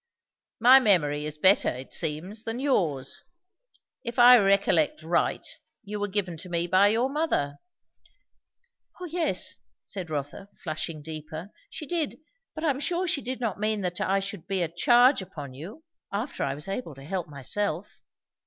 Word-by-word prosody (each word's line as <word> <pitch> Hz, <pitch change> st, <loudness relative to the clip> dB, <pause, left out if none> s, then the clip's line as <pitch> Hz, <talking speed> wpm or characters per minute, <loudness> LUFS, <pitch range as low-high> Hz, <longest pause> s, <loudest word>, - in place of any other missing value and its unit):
"My 250 Hz, +4 st, +8 dB
memory 150 Hz, -, +2 dB
is 150 Hz, 0 st, -5 dB
better, 190 Hz, +5 st, +4 dB
it 130 Hz, +2 st, -7 dB
seems, 180 Hz, +9 st, -2 dB
than 225 Hz, +2 st, -4 dB
yours. 165 Hz, -, 0 dB, 0.8 s
If 235 Hz, -2 st, -5 dB
I 245 Hz, 0 st, +9 dB
recollect 195 Hz, -6 st, +2 dB
right, 170 Hz, +2 st, 0 dB, 0.4 s
you 210 Hz, 0 st, -5 dB
were 205 Hz, -, -1 dB
given 190 Hz, -4 st, -2 dB
to 180 Hz, -, -8 dB
me 170 Hz, 0 st, 0 dB
by 185 Hz, +3 st, +5 dB
your 230 Hz, +5 st, +2 dB
mother." 270 Hz, -, -1 dB, 1.4 s
"O 365 Hz, -, -5 dB
yes," 340 Hz, -1 st, 0 dB, 0.3 s
said 185 Hz, -4 st, -6 dB
Rotha, 150 Hz, +6 st, -5 dB
flushing 155 Hz, -1 st, -4 dB
deeper, 160 Hz, +4 st, -7 dB, 0.2 s
"she 305 Hz, -, -7 dB
did. 320 Hz, -2 st, -2 dB, 0.4 s
But 315 Hz, -, -6 dB
I 315 Hz, -, +3 dB
am 270 Hz, -, -4 dB
sure 350 Hz, +5 st, 0 dB
she 300 Hz, -4 st, +1 dB
did 255 Hz, 0 st, -4 dB
not 225 Hz, -5 st, -2 dB
mean 215 Hz, 0 st, 0 dB
that 180 Hz, -2 st, -2 dB
I 195 Hz, +1 st, +2 dB
should 195 Hz, -3 st, -6 dB
be 190 Hz, -2 st, 0 dB
a -, -, 0 dB
charge 240 Hz, -, +4 dB
upon 150 Hz, -8 st, -8 dB
you, 185 Hz, -, -10 dB, 0.3 s
after 215 Hz, +8 st, -3 dB
I 135 Hz, -, -1 dB
was 150 Hz, +6 st, -9 dB
able 195 Hz, -, -4 dB
to 135 Hz, -, -12 dB
help 180 Hz, +2 st, -3 dB
myself." 155 Hz, +6 st, -3 dB
195 Hz, 165 wpm, -27 LUFS, 155-240 Hz, 1.4 s, I